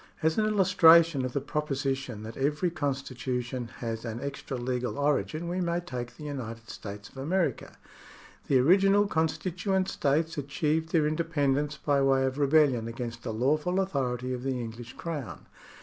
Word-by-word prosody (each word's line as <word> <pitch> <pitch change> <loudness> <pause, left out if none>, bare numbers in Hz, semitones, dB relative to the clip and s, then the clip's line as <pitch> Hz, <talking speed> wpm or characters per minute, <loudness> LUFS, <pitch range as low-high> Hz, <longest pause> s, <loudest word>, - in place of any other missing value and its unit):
As 160 0 +3
an 215 - +2
illustration 170 -7 +6
of 125 - -4
the - - +1
proposition 135 -5 -2
that 110 +1 -7
every 150 +6 0
constitu 135 -4 -2
tion 120 0 -5
has 115 -1 -5
an 115 -1 -4
extra 140 -1 -5
legal 125 +1 -2
origin, 150 +3 0
we 180 +2 -1
may 170 0 0
take 125 -9 -6
the 155 - -10
United 115 -6 -6
States 100 0 -8
of - - -18
America. 155 -1 -1 0.7
The 135 - +4
original 195 +9 +5
constituent 185 +2 0
states 155 +3 0
achieved 150 +3 -1
their 160 -3 +3
independence 150 -2 0
by 140 -1 +1
way 135 -1 +3
of 130 +2 -2
rebellion 140 -5 +3
against 115 0 -5
the 115 - -4
lawful 150 - +1
authority 130 -9 -1
of 125 - -4
the 130 -1 -2
English 115 +1 -7
Crown. 145 - -6
140 Hz, 160 wpm, -28 LUFS, 125-160 Hz, 0.7 s, illustration